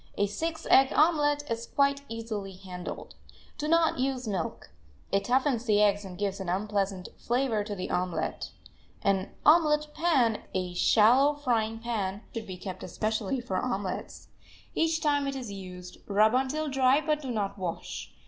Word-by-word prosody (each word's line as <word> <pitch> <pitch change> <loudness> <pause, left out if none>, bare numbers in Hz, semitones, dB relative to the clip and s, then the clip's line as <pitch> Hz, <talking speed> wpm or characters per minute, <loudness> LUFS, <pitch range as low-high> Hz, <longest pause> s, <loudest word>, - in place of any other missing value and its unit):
A 205 - +3
six 320 +11 -4
egg 265 0 +6
omelet 295 -2 +3
is 230 0 -3
quite 280 0 +2
easily 220 -4 -5
handled. 185 -1 -8 0.5
Do 300 - -2
not 330 -3 +3
use 255 -2 -1
milk; 190 -6 -4 0.4
it 195 0 +2
toughens 255 -1 +1
the 210 -1 +4
eggs 205 -1 +3
and 185 -2 -9
gives 200 -1 -2
an 190 -2 -4
unpleasant 195 -1 -1
flavor 240 -3 0
to 205 0 -5
the 185 - -5
omelet. 180 -3 -2 0.5
An 195 -1 +1 0.2
"omelet 300 -1 +5
pan," 265 -10 +2
a 180 -1 -2
shallow 245 +10 +5
frying 230 -6 0
pan, 210 -4 -3
should 225 -2 -5
be 185 -1 -6
kept 185 0 -7
especially 220 +3 -2
for 195 -6 -3
omelets. 200 -6 -4 0.4
Each 325 0 +1
time 290 -2 +1
it 275 - -2
is 250 -6 -5
used 180 -2 -9
rub 215 +2 +4
until 270 +4 0
dry, 270 0 +3
but 305 -1 0
do 270 - -6
not 205 -4 -2
wash. 175 -3 -5
225 Hz, 160 wpm, -28 LUFS, 195-275 Hz, 0.5 s, egg